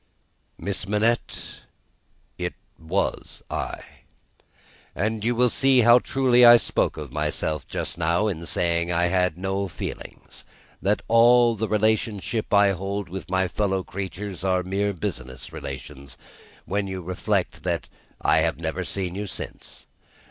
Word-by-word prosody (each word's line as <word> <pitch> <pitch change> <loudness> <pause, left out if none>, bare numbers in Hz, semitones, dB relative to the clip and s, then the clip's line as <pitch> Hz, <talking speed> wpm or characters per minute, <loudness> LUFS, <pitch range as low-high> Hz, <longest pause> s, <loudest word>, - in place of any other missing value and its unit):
"Miss 100 0 -3
Manette, 110 +3 -1 0.8
it - - -3 0.2
was 85 +5 -3
I. - - -4 1.1
And 105 +3 -1
you 120 +2 +1
will 125 0 +3
see 135 -2 +4
how 120 +2 +7
truly 125 -1 +3
I 120 0 +10
spoke - - 0
of 75 -4 -7
myself 75 +1 -2
just - - -4
now, 85 +5 +2
in 85 -5 -3
saying 85 +1 0
I 85 0 +2
had 90 -3 +2
no 95 +1 -2
feelings, 85 - -8 0.4
and 95 - -1
that 105 - +1
all 120 +1 +6
the 110 +1 -2
relations 110 -1 +1 0.2
I 100 -1 +6
hold 95 +1 -4
with 95 +1 -7
my 95 0 +1
fellow 95 0 -1
creatures 95 0 -6
are 90 -1 +1
mere 100 +2 0
business 65 -6 -6
relations, 70 0 -8 0.5
when 100 +1 -1
you 95 -1 -5
reflect 90 +2 -1
that - - -2 0.3
I - - +3
have - - +1
never 85 +3 -3
seen 90 -1 -2
you 100 +2 -4
since. - - -7
95 Hz, 140 wpm, -24 LUFS, 85-110 Hz, 1.1 s, I